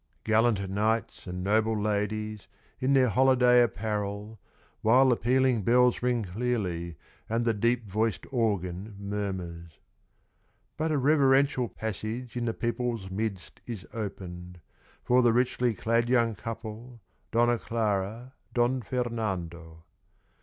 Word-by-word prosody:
Gallant 110 -3 +2
knights 105 +2 -1
and 90 0 -4
noble 110 +2 +2
ladies, 105 0 -2 0.3
In 130 +1 +2
their 130 -2 +4
holiday 125 0 +5
apparel; 105 0 -2 0.4
While 130 +4 +5
the 125 - +4
pealing 125 0 +2
bells 125 +4 +3
ring 120 -2 +1
clearly, 90 -5 -2 0.3
And 115 +1 0
the 115 - +3
deep 115 +2 0
voiced 110 0 -1
organ 100 -4 -1
murmurs. 95 -5 -5 1.0
But 160 0 -1
a 150 - +2
reverential 135 -3 +3
passage 110 +3 -5
In 120 -1 -2
the 115 - 0
people's 115 -4 -2
midst 100 -2 -4
is 110 -6 -6
opened, 90 -4 -6 0.4
For 125 +1 +4
the 120 -2 +4
richly 125 -1 +1
clad 115 +4 +1
young 120 -3 +3
couple, 115 +2 -7 0.3
Donna 120 0 +2
Clara, 110 +2 -2 0.2
Don 125 +2 +2
Fernando. 95 -10 -4
110 Hz, 120 wpm, -28 LUFS, 100-120 Hz, 1.0 s, holiday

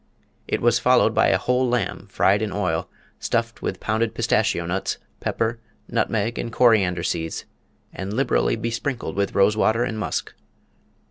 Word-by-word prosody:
It - - -1
was - - +4
followed - - +4
by - - +4
a - - +4
whole 125 0 +1
lamb 110 -4 -2
fried 100 +1 +3
in 110 -2 -2
oil, 90 -5 -1 0.3
stuffed 115 0 -1
with - - -3
pounded 110 0 -1
pistachio 85 - +1
nuts, 90 +3 -2 0.2
pepper, 115 +1 -1 0.3
nutmeg, 115 +1 -1
and 115 - -3
coriander 100 -8 +3
seeds, 80 -2 -3 0.5
and 95 +1 -5
liberally 125 +4 +1
besprinkled 115 +3 -3
with 100 0 -1
rose 100 +2 +4
water 110 +2 +2
and 115 -3 -3
musk. 105 - -3
110 Hz, 150 wpm, -23 LUFS, 95-115 Hz, 0.5 s, was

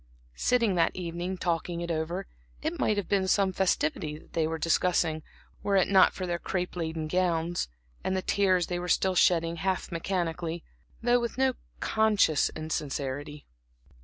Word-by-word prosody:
Sitting 235 -5 +3
that 170 -2 +2
evening, 175 +1 -4
talking 170 0 -1
it 170 0 -3
all 160 - 0
over, 170 +5 -3 0.4
it 320 +2 -2
might 215 - +2
have 205 - -2
been 195 -2 +1
some 190 0 +2
festivity 155 -5 0
that - - -19
they 160 -1 +1
were 160 0 -2
discussing, 165 -1 +1 0.4
were 200 - +1
it 190 - +4
not 195 -1 +6
for 185 - -4
their 175 -1 -2
crape 180 0 -3
laden 160 -2 -3
gowns, 175 0 0 0.4
and 190 - 0
the 185 - -2
tears 185 -3 +2
they 175 -1 -3
were 180 - -4
still 190 +1 +2
shedding 170 -2 +3
half 185 +3 -1
mechanically, 170 -1 -2 0.4
though 245 +1 +4
with 235 0 -3
no 265 0 +3 0.3
conscious 210 -8 +3
insincerity. 145 -2 -4
175 Hz, 165 wpm, -28 LUFS, 165-190 Hz, 0.4 s, not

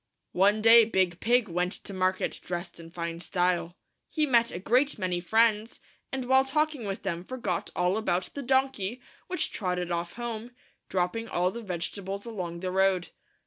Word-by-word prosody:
One 205 +3 +3
day 230 +1 +9
Big 185 -5 +1
Pig 240 0 +3
went 180 +1 -1
to 200 - -8
market 185 0 0
drest 175 0 -5
in 165 0 -10
fine 170 -1 -5
style. 175 -1 0 0.3
He 310 -1 +1
met 235 -4 +3
a - - -5
great 250 +10 +2
many 180 -3 -1
friends, 220 +4 +2 0.3
and 265 -1 -3
while 265 +1 +5
talking 300 -2 0
with 195 -1 -4
them 175 -3 -3
forgot 205 -6 -3
all 180 +3 +1
about 185 -4 -1
the 285 - -5
donkey, 260 -4 0 0.3
which 365 - -1
trotted 180 -3 -2
off 170 0 -2
home, 235 0 -5 0.4
dropping 190 +5 -1
all 180 +1 +1
the 235 - -7
vegetables 195 +1 -4
along 180 -7 -5
the 185 -1 -2
road. 190 -1 +2
195 Hz, 170 wpm, -28 LUFS, 180-235 Hz, 0.4 s, day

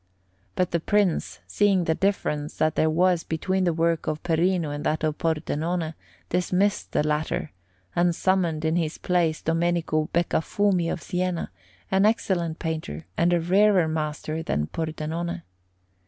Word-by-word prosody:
But 180 - 0
the 170 - +1
Prince, 200 0 0
seeing 200 -3 +2
the 160 - +1
difference 155 -6 -1
that 155 0 +2
there 155 - +2
was 175 +1 +2
between 185 +4 -1
the 175 - +3
work 165 0 0
of 155 0 -2
Perino 170 -1 +1
and 145 0 -4
that 155 +1 0
of 155 -1 -1
Pordenone, 165 0 -1 0.4
dismissed 180 +3 0
the 150 - +1
latter, 150 0 -1 0.4
and 175 -1 +2
summoned 170 -5 +1
in 160 +2 +2
his 160 -2 -1
place 170 -3 0
Domenico 165 -1 0
Beccafumi 175 +1 +1
of - - -4
Siena, 180 -1 -2 0.4
an 190 +2 +4
excellent 175 -7 0
painter 155 - -4
and 170 +1 +2
a 175 - +3
rarer 190 +1 +4
master 155 0 -3
than 75 - -1
Pordenone. 165 - -4
165 Hz, 145 wpm, -25 LUFS, 155-180 Hz, 0.4 s, an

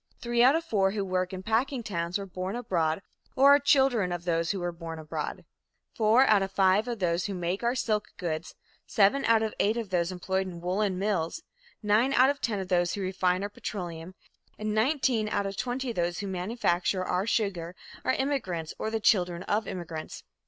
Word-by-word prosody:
Three 240 0 +1
out 260 +4 +6
of 330 0 -1
four 195 -9 +2
who 200 0 -2
work 185 -1 -1
in 190 0 -6
packing 235 +4 0
towns 175 -4 -2
were 200 - -5
born 185 +2 -5
abroad 180 -7 -1 0.3
or 275 +2 +7
are 285 - +6
children 265 -9 +3
of 175 -1 -4
those 165 -1 0
who 200 - -1
were 175 0 -2
born 165 -1 -7
abroad; 155 -1 -5 0.5
four 225 +3 +4
out 210 -5 +4
of 195 0 -2
five 195 +3 +3
of 240 -1 -3
those 175 -2 0
who 200 - -4
make 175 +2 -2
our 240 +1 +1
silk 215 -4 0
goods, 165 -2 -4 0.3
seven 210 +7 +3
out 225 -1 +4
of 220 - -2
eight 215 +3 +2
of 225 -5 -4
those 175 0 +1
employed 190 +1 -2
in 175 -2 -7
woolen 185 +2 -1
mills, 195 - -1 0.4
nine 215 +6 +3
out 260 +2 +5
of 285 - -8
ten 220 -3 -1
of 190 - -4
those 175 -1 +1
who 200 - -4
refine 185 0 0
our 205 - -3
petroleum, 180 -4 -6 0.4
and 215 0 -2
nineteen 230 -2 +1
out 200 - 0
of 195 0 -4
twenty 250 +3 -2
of - - -9
those 175 0 -1
who 200 - -4
manufacture 185 -1 0
our 185 +4 -1
sugar 185 -6 -1 0.3
are - - +2
immigrants 190 - -2
or 220 - -2
the 225 0 -1
children 180 -5 +2
of 210 +3 -1
immigrants." 165 -3 -6
195 Hz, 205 wpm, -28 LUFS, 180-225 Hz, 0.5 s, or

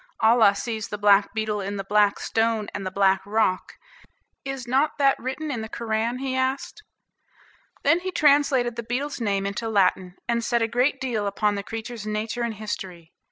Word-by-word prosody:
"Allah 220 -2 +5
sees 220 -1 -4
the 210 - -5
black 205 -1 +4
beetle 215 -2 -2
in 200 +1 -4
the 195 - -3
black 205 +1 +3
stone, 225 -2 0
and 200 - -4
the - - -1
black 195 0 +2
rock. 205 -2 0 0.7
Is 270 -2 -5
not 270 +5 +1
that 275 -1 +4
written 280 +4 -4
in 235 -5 -3
the 220 - -6
Koran?" 225 +1 -2
he 260 0 -3
asked. 260 +10 -2 1.0
Then 335 - +4
he 370 +1 -4
translated 280 -6 +3
the - - -2
beetle's 250 +4 -3
name 200 -3 0
into 205 +3 -3
Latin, 190 -3 +1
and 235 -1 0
said 235 0 +1
a - - +1
great 245 +5 +1
deal 225 -6 -2
upon 205 +1 0
the 200 - -3
creature's 225 +1 -7
nature 215 +2 -3
and 235 -2 -2
history. 185 -5 -7
225 Hz, 185 wpm, -24 LUFS, 205-250 Hz, 1.0 s, Allah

